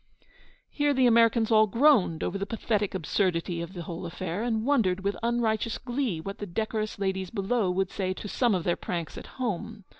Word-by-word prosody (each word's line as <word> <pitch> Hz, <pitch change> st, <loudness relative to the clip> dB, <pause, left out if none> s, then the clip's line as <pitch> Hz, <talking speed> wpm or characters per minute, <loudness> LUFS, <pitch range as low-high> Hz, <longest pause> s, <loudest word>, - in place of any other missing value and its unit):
Here 290 Hz, -1 st, +1 dB
the 260 Hz, -1 st, +4 dB
Americans 230 Hz, -1 st, +4 dB
all 215 Hz, -1 st, +6 dB
groaned 230 Hz, -, +3 dB
over 200 Hz, -, -2 dB
the 200 Hz, -, -3 dB
pathetic 210 Hz, -2 st, -1 dB
absurdity 175 Hz, -1 st, 0 dB
of 170 Hz, +2 st, -6 dB
the 175 Hz, -3 st, -6 dB
whole 170 Hz, +1 st, -6 dB
affair, 175 Hz, +2 st, -4 dB
and 225 Hz, -2 st, -1 dB
wondered 205 Hz, -10 st, +2 dB
with 200 Hz, +1 st, -1 dB
unrighteous 230 Hz, -1 st, 0 dB
glee 245 Hz, -, -2 dB
what 195 Hz, +5 st, -6 dB
the 205 Hz, -, -5 dB
decorous 215 Hz, +3 st, -2 dB
ladies 190 Hz, -2 st, -2 dB
below 205 Hz, -1 st, 0 dB
would 185 Hz, +1 st, 0 dB
say 185 Hz, -2 st, -2 dB
to 210 Hz, -, -7 dB
some 235 Hz, 0 st, +2 dB
of 180 Hz, -, -1 dB
their 175 Hz, -, +1 dB
pranks 170 Hz, -3 st, -4 dB
at -, -, -8 dB
home. 220 Hz, -3 st, -3 dB
205 Hz, 190 wpm, -27 LUFS, 185-230 Hz, -, all